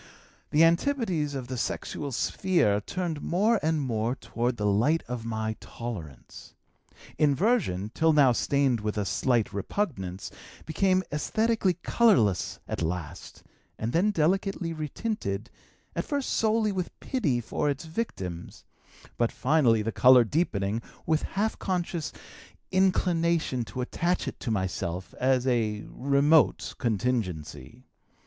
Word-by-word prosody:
"The 155 +2 +4
antipodes 170 - +1
of 130 -3 -5
the 125 -1 -4
sexual 140 +3 -3
sphere 120 - +1
turned 170 -2 -3
more 210 +5 +2
and 160 0 +1
more 120 -3 -1
toward 120 -2 -2
the 105 - -2
light 115 +11 +2
of 120 -2 -5
my 110 -1 -2
tolerance. 80 - -8 0.6
Inversion, 145 - +2
till 160 0 +3
now 145 -4 +5
stained 135 0 +1
with 105 0 -3
a 105 - 0
slight 120 +1 +1
repugnance, 100 - -3 0.3
became 185 +3 +2
esthetically 210 +5 +1
colorless 115 - +3
at - - -3
last, 85 0 -5 0.3
and 115 +2 -3
then 185 +6 +3
delicately 185 0 0
retinted, 150 - -4 0.4
at - - -1
first 285 -2 -2
solely 220 -1 +2
with 185 -2 -4
pity 160 - 0
for 120 +5 -1
its 140 +3 -3
victims, 95 - -5 0.5
but 120 -1 +2
finally, 125 -6 +3
the 115 - -1
color 125 0 +7
deepening, 110 - -1 0.2
with 160 -1 +2
half 215 +3 -2
conscious 175 -4 -2 0.6
inclination 170 -7 +2
to 125 - -5
attach 170 +8 -1
it - - -5
to 125 - -4
myself 95 -3 -2
as 130 -1 +2
a 110 -4 0
remote 140 +4 +3
contingency. 100 - -2
135 Hz, 125 wpm, -27 LUFS, 110-175 Hz, 0.6 s, color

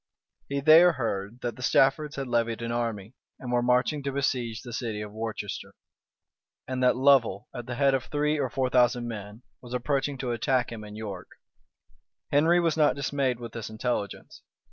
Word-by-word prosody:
He 140 0 -1
there 165 +4 +7
heard 115 -3 -3
that 120 0 -4
the - - -10
Staffords 140 +4 +2
had 135 -1 -4
levied 115 -1 0
an 115 - -3
army, 115 -3 -3 0.2
and 125 -2 -6
were 120 0 +2
marching 125 +4 +2
to 140 0 -3
besiege 125 -4 -1
the 120 -2 -8
city 115 -3 -3
of 105 -1 -6
Worcester; 110 -2 -5 0.9
and 130 -1 -3
that 125 0 +4
Lovel, 130 -7 +3
at 120 -1 -7
the 120 - -4
head 140 +1 +3
of 130 -1 0
three 150 +1 0
or 135 -3 0
four 130 0 -1
thousand 120 -1 +3
men, 105 0 -8 0.2
was 125 0 -6
approaching 135 +2 -1
to 130 -2 -3
attack 125 +1 0
him 110 -2 -7
in 105 0 -10
York. 105 -4 -7 1.0
Henry 165 +5 +4
was 165 -3 +1
not 150 -2 +3
dismayed 140 -3 -1
with 120 -1 -7
this 115 -2 -6
intelligence. 110 -2 -4
125 Hz, 185 wpm, -27 LUFS, 115-140 Hz, 1.0 s, there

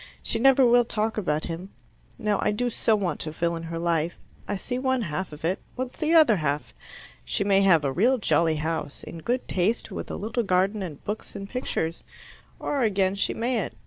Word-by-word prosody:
She - - 0
never 270 +1 +6
will 240 0 +6
talk 220 -1 -1
about 155 -7 -1
him. 175 +3 -5 0.5
Now 210 -3 0
I - - +2
do 240 +4 0
so 220 0 +2
want 195 -4 -1
to 155 - -3
fill 170 +2 -1
in 165 - -5
her 165 - -3
life. 165 0 0 0.3
I 205 - -1
see 245 +6 -3
one 260 -2 +1
half 170 0 -3
of 150 +1 -7
it. 185 +4 0 0.2
What's 255 0 -5
the 320 +2 +2
other 300 -10 +6
half? 150 -2 -2 0.5
She 205 - -1
may 195 -1 +4
have 170 -6 +5
a 135 - +1
real 240 - +3
jolly 165 -7 +2
house, 155 -1 -3
in 165 - -8
good 245 +9 -2
taste, 195 +6 0
with - - -5
a - - -4
little 220 +4 -2
garden 195 +1 +1
and 160 -7 -7
books, 210 +2 -5
and 195 0 -6
pictures. 170 -9 -3 0.5
Or, 285 -2 -1
again, 195 -4 +2
she 200 - -1
mayn't. 230 -3 -1
195 Hz, 210 wpm, -26 LUFS, 165-235 Hz, 0.5 s, never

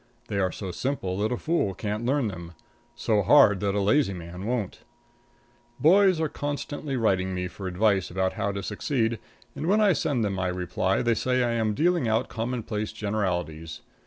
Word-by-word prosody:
They 100 -2 -1
are 95 -2 +1
so 95 +2 -6
simple 95 -5 -2
that 110 +1 0
a 125 - 0
fool 155 - 0
can't 105 +2 -3
learn 135 -2 +1
them; 85 -4 -7 0.4
so 110 -3 +1
hard 105 -2 +6
that 100 0 -1
a - - +2
lazy 100 +1 +2
man 90 +3 -7
won't. 115 -6 -2 1.0
Boys 185 +2 +5
are 160 - +1
constantly 145 -1 -4
writing 95 -5 +1
me 90 0 -2
for 95 +2 -7
advice 95 +1 +1
about 95 +1 -1
how 100 -2 -1
to 100 0 -4
succeed, 115 +3 -1 0.4
and 160 - -4
when 205 +4 +4
I 205 -3 +5
send 135 -6 0
them 100 - -1
my 90 -1 -1
receipt 90 +1 -1
they 120 -1 +3
say 125 +3 0
that 120 - +1
I - - 0
am 110 -2 0
dealing 170 -3 +2
out 110 0 +1
commonplace 115 -2 -3
generalities. 90 -6 -3
105 Hz, 190 wpm, -26 LUFS, 95-125 Hz, 1.0 s, hard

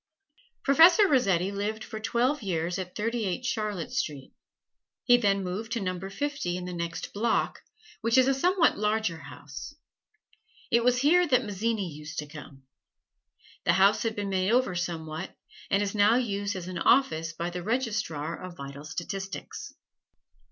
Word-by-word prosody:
Professor 335 +8 +7
Rossetti 195 - +2
lived 210 +2 -3
for 220 - -7
twelve 250 +6 0
years 175 -2 -2
at 180 -1 -6
Thirty 230 +2 -1
eight 200 +6 -2
Charlotte 215 -9 -2
Street; 140 -4 -3 0.7
he 245 - +6
then 200 -5 +2
moved 210 +5 -4
to 235 - -1
Number 185 -1 -3
Fifty 275 -7 -2
in 180 - -5
the 180 - -5
next 170 -1 -4
block, 225 +3 0 0.4
which 230 +2 +2
is 260 0 +6
a 270 - +4
somewhat 350 - +3
larger 210 -5 0
house. 145 - -9 1.0
It 235 0 +4
was 250 0 +3
here 350 +5 +5
that 255 -4 +3
Mazzini 210 0 -1
used 150 -1 -9
to 150 - -2
come. 145 -2 -12 1.0
The 170 - +3
house 195 +3 +4
had 225 -1 -1
been 205 -1 -3
made 190 +1 +1
over 250 -5 +2
somewhat, 165 -3 -4 0.3
and 200 +1 +2
is 200 - -2
now 210 +2 +5
used 205 -5 -1
as 180 -1 -6
an 185 -1 -4
office 165 -11 +3
by 170 +1 -4
the 180 0 -5
Registrar 210 - -2
of 185 -2 -8
Vital 140 +1 -8
Statistics. 195 - -6
200 Hz, 160 wpm, -28 LUFS, 175-235 Hz, 1.0 s, Professor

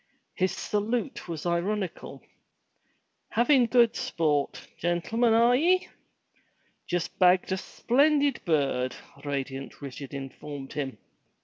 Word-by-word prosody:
His 185 0 +1
salute 225 +5 -2
was 165 -1 -5
ironical. 180 +2 -2 1.1
"Havin' 245 +1 +4
good 235 -1 +4
sport, 150 -4 -1
gentlemen, 220 +8 +1
are 235 +2 +5
ye?" 360 +7 +2 1.0
*'Just 175 -2 -2
bagged 180 0 +4
a 190 - +1
splendid 280 +6 +2
bird!" 135 -6 +1 0.3
radiant 135 -1 -4
Richard 140 0 -8
informed 135 0 -7
him. 135 -5 -4
180 Hz, 100 wpm, -27 LUFS, 145-235 Hz, 1.1 s, are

